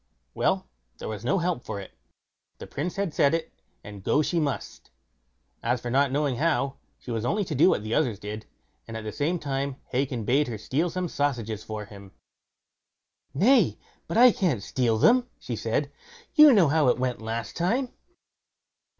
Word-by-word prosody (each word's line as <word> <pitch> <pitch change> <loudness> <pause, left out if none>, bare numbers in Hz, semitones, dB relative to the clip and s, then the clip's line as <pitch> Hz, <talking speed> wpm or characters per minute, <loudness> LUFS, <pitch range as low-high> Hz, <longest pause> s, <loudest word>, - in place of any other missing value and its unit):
Well, - - 0 0.3
there - - -7
was 105 -1 -5
no 130 +11 +1
help 175 -7 -1
for 100 - -5
it; 95 - -11 0.6
the - - -8
Prince 170 +5 -4
had 195 -5 -2
said 140 +3 +3
it, 165 - -4 0.3
and 105 -2 -10
go 150 - +2
she 170 +3 0
must. 145 -3 -4 0.7
As 120 +2 0
for 120 +1 -5
not 140 +1 +3
knowing 140 -3 0
how, 140 -2 0 0.2
she 125 - -9
was 115 -2 -2
only 205 - 0
to 160 - -4
do 150 +6 +5
what 105 - +1
the 110 +1 -3
others 120 -9 +1
did, 105 +2 -7 0.4
and 115 -1 -6
at 110 - -7
the 110 - -4
same 155 +8 -1
time 140 -3 -3
Hacon 125 -3 -1
bade 140 +6 +2
her 115 -3 -4
steal 145 - -1
some 180 +1 -2
sausages 120 -9 -2
for 110 -1 -6
him. 100 -2 -13 1.2
"Nay, 240 - +4 0.3
but - - -2
I 245 +1 +8
can't 175 - 0
steal 120 -3 0
them", 245 - +4
she - - -5
said; - - -1 0.4
"you 305 -2 +9
know 195 - +5
how 155 -2 +3
it 125 - +3
went 125 -2 -2
last 110 +1 -4
time." 235 +9 0
135 Hz, 185 wpm, -26 LUFS, 115-170 Hz, 1.2 s, you